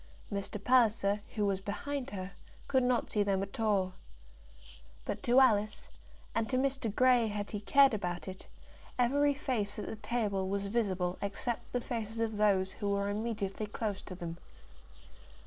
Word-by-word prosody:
Mr. 200 +1 -3
Palliser, 220 -5 +3
who 210 -2 +1
was 195 -1 0
behind 270 +7 -3
her, 190 -1 -5 0.4
could 260 -2 +3
not 250 -1 +1
see 210 - +2
them 195 -1 +1
at 195 +2 -8
all. 200 -4 +2 1.1
But - - -3
to 245 +2 +5
Alice, 215 -5 +3 0.4
and 225 0 0
to 255 - +1
Mr. 270 -3 0
Grey, 250 +1 +4
had 205 -1 -4
he 210 - -3
cared 275 +5 +5
about 175 -4 -3
it, 185 0 -8 0.5
every 285 +4 +3
face 235 -8 -2
at 210 - -4
the - - -5
table 210 -4 -1
was 200 0 -1
visible 190 -4 0
except 235 +4 -3
the 245 - -1
faces 225 -2 -4
of 225 -2 -1
those 195 -3 +3
who 205 0 -3
were 200 0 0
immediately 210 -1 -2
close 210 -2 -3
to 185 - -8
them. 170 -1 -6
210 Hz, 165 wpm, -32 LUFS, 200-240 Hz, 1.1 s, to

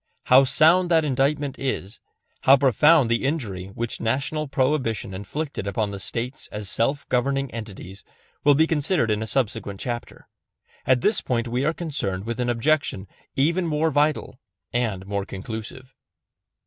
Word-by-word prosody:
How 130 +2 +6
sound 175 +6 +4
that 165 -2 +3
indictment 140 +1 0
is, 120 -6 -3 0.4
how 135 +1 +7
profound 140 +2 +5
the 115 +2 0
injury 110 - -2
which 115 +4 -5
National 140 +6 -1
Prohibition 130 -7 0
inflicted 105 +4 -5
upon 105 0 -1
the 100 - -6
States 120 +6 -4
as 105 -1 -5
self 135 +8 0
governing 135 +1 0
entities, 100 -4 -8 0.4
will 145 -1 +6
be 160 +3 +4
considered 155 - +1
in 105 0 0
a 110 - -3
subsequent 110 -5 -2
chapter. 120 -2 -6 0.6
At 130 -1 +4
this 210 - +2
point 120 -1 -1
we 125 +3 -1
are 155 - +3
concerned 110 - -3
with 115 +1 -4
an 120 0 0
objection 120 -5 0 0.3
even 170 +6 +1
more 155 +1 +1
vital 145 -3 0 0.3
and 110 -6 -1
more 100 0 -2
conclusive. 110 +7 -8
125 Hz, 150 wpm, -24 LUFS, 110-145 Hz, 0.6 s, how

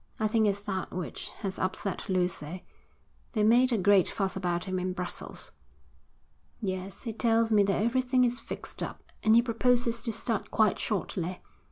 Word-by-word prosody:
I 215 - +2
think 220 0 +3
it's 200 0 0
that 195 -2 -3
which 180 -4 -5 0.2
has 190 -1 -2
upset 185 +1 -3
Lucy. 180 -2 -1 0.7
They 215 -3 +1
made 245 +4 +5
a 230 - +2
great 195 -1 +5
fuss 195 -2 -1
about 175 -2 -1
him 185 -1 -2
in 185 0 -2
Brussels.' 180 -1 -5 1.1
'Yes, 190 -2 -4
he 230 -3 -4
tells 225 0 +2
me 210 -1 +6
that 195 +1 +1
everything 250 +2 +2
is 245 0 +1
fixed - - -7
up, - - -5 0.2
and 220 0 +5
he 235 - +6
proposes 240 0 +2
to 230 - -2
start 220 0 -2
quite 215 -3 +2
shortly. 185 -3 -2
205 Hz, 170 wpm, -29 LUFS, 185-230 Hz, 1.1 s, me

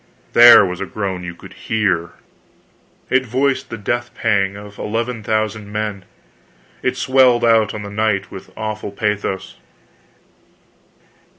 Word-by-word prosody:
There 120 -3 +9
was 90 0 -5
a 95 - -3
groan 95 -3 -4
you 85 -1 -7
could - - -13
hear! 95 -7 -1 1.0
It 130 0 +3
voiced 130 +3 -1
the 115 - -6
death 120 +3 -3
pang 100 -3 0
of 105 0 -12
eleven 115 +2 -3
thousand 110 -1 -2
men. 105 -3 -4 0.8
It - - -1
swelled 125 -2 +3
out 115 -3 +3
on 105 - -6
the 100 - -8
night 100 -2 -1
with 95 0 -10
awful 110 -1 -4
pathos. 100 -2 -3
105 Hz, 130 wpm, -19 LUFS, 100-115 Hz, 1.0 s, There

